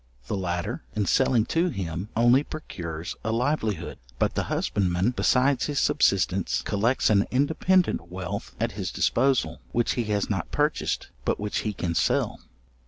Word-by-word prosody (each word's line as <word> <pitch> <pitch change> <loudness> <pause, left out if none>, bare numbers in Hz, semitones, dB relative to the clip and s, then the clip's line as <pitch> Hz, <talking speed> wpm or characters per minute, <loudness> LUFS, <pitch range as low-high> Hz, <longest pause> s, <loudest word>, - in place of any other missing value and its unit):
The - - -2
latter, 90 +3 -3
in 105 -1 +1
selling 120 +2 +3
to 170 +2 +2
him, 90 - -4
only 120 +4 +5
procures 85 - -6
a 110 - -1
livelihood; 115 - -1 0.2
but - - +1
the - - -1
husbandman, 95 +2 +1
besides 130 +1 +2
his 145 -1 -3
subsistence, 95 -6 +2
collects 110 +4 +1
an 100 -1 +3
independent 160 - +2
wealth 90 -1 -5
at - - 0
his - - -4
disposal, 135 -1 +1
which 120 0 +2
he 120 - -1
has 105 -2 0
not 95 -5 -2
purchased, 150 +1 0
but - - 0
which 105 0 -2
he 110 - -2
can 90 -3 -2
sell. - - +1
110 Hz, 155 wpm, -26 LUFS, 95-130 Hz, 0.2 s, only